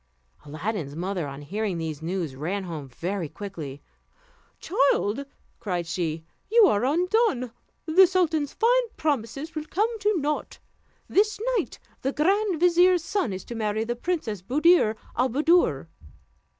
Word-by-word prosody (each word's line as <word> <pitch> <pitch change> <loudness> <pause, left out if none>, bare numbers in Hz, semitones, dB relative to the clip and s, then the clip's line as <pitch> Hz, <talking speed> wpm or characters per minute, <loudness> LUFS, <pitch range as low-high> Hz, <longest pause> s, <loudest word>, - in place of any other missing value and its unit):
Aladdin's 155 0 -4
mother, 180 -1 -3
on 140 +1 -8
hearing 200 +3 -2
these 160 -2 -4
news, 165 -4 -3
ran 180 +8 -3
home 155 -6 -6
very 175 +4 -4
quickly. 155 -9 -8 0.8
"Child," 275 - +1 0.3
cried 180 -4 -2
she, 160 -1 -3 0.3
"you 460 -1 +7
are 210 - +2
undone! 350 - +1 0.3
the 360 +4 +6
sultan's 330 -6 +1
fine 485 +1 +2
promises 285 +1 -2
will 310 -1 -4
come 435 +8 -1
to 415 -1 +1
nought. 300 +1 -2 0.5
This 420 +2 +2 0.2
night - - -3 0.2
the 270 +2 -1
grand 385 +2 +1
vizier's 355 0 +4
son 380 - -1
is 190 0 -6
to - - -7
marry 215 -1 -1
the 240 +1 -2
Princess 240 - -3
Buddir 290 - +4 0.2
al 255 +2 +2
Buddoor." 295 - +3
240 Hz, 135 wpm, -26 LUFS, -, 0.8 s, you